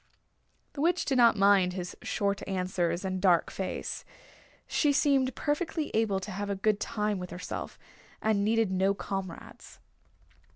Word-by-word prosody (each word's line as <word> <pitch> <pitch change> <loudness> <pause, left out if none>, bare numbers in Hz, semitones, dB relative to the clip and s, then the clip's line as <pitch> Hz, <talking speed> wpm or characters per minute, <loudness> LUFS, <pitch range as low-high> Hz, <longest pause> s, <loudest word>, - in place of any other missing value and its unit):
The 280 - -5
Witch 345 +3 +2
did 265 -3 +1
not 235 -2 +6
mind 195 -2 +4
his 180 -1 -5
short 200 -1 -1
answers 180 -2 -1
and 185 -1 -2
dark 180 -4 +3
face. 190 - -4 0.6
She 295 - +2
seemed 275 -3 +2
perfectly 315 +1 -2
able 215 -3 +1
to 210 - -6
have 200 +2 -4
a 200 - 0
good 205 +1 +1
time 210 -2 -1
with 180 0 -6
herself, 180 - -6 0.4
and 215 -2 +1
needed 220 -1 +2
no 190 +1 +2
comrades. 195 -3 -7
200 Hz, 150 wpm, -29 LUFS, 185-225 Hz, 0.6 s, not